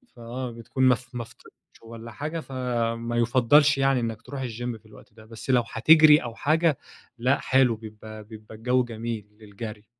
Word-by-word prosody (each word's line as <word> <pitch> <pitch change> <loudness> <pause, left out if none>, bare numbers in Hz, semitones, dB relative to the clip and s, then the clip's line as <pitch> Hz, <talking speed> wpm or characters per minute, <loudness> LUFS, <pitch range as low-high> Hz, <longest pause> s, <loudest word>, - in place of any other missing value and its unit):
فآه، 120 +1 -6
بتكون 115 +3 -4
م 125 - +5 0.2
ما 120 -1 -4
فطرتش - - -18 0.3
والّا 115 0 -10
حاجة 155 +6 -5
فما 120 -3 -3
يُفضلش 130 +5 +4
يعني 135 -1 +2
إنك 115 -1 -4
تروح 140 +1 -7
الGym 120 0 -5
في - - -34
الوقت 105 0 -17
ده، 110 -1 -16
بس 115 +3 -11
لو 125 -2 +4
هتجري 155 +5 +7
أو 115 -1 -7
حاجة 155 -1 +1 0.4
لأ 130 +4 +1
حلو 130 -3 +3
بيبقى 110 0 -11
بيبقى 110 0 -12
الجو 125 +3 +1
جميل 115 -2 -6
للجري. 105 0 -9
120 Hz, 170 wpm, -25 LUFS, 110-130 Hz, 0.4 s, هتجري